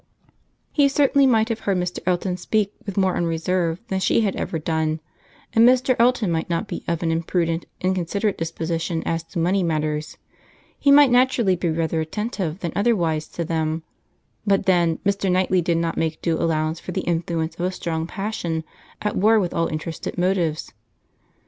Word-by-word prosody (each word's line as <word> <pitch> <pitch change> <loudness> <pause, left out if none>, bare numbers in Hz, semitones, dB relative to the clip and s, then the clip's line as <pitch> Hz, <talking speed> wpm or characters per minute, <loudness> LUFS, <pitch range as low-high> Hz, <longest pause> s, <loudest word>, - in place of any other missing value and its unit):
He 285 -2 +4
certainly 280 0 +4
might 225 -3 +3
have 225 -1 -2
heard 195 -2 0
Mr. 180 0 -2
Elton 180 0 0
speak 200 +3 -1
with 200 - -5
more 190 -2 +2
unreserve 170 0 0
than 190 - 0
she 190 - +2
had 200 -4 0
ever 165 - -3
done, 160 0 -1 0.5
and 225 - +5
Mr. 255 0 +3
Elton 235 -5 +3
might 165 +1 -1
not 170 -1 -1
be - - -5
of 170 0 -1
an 165 - +1
imprudent, 165 0 -1
inconsiderate 185 +3 0
disposition 165 0 -3
as 165 0 -1
to 175 - -9
money 180 +4 +2
matters; 155 -2 -2 0.6
he 280 - +2
might 280 -2 +7
naturally 245 -6 +3
be 175 0 -1
rather 160 0 0
attentive 190 0 -3
than 170 - -2
otherwise 170 -8 +1
to 170 - -4
them; 160 0 -1 0.6
but 200 -2 +2
then, 175 -3 +3
Mr. 200 -1 +1
Knightley 185 0 +2
did 170 0 +1
not 165 0 -1
make 160 -1 -1
due 165 -2 0
allowance 160 -1 0
for 180 - -7
the - - -1
influence 165 -1 -1
of 175 - 0
a - - -2
strong 165 -3 -3
passion 175 -5 -3 0.4
at 210 - -1
war 220 +3 +4
with 180 -4 -1
all 165 - +1
interested 160 +3 -5
motives. 175 -4 0
175 Hz, 175 wpm, -22 LUFS, 165-200 Hz, 0.6 s, might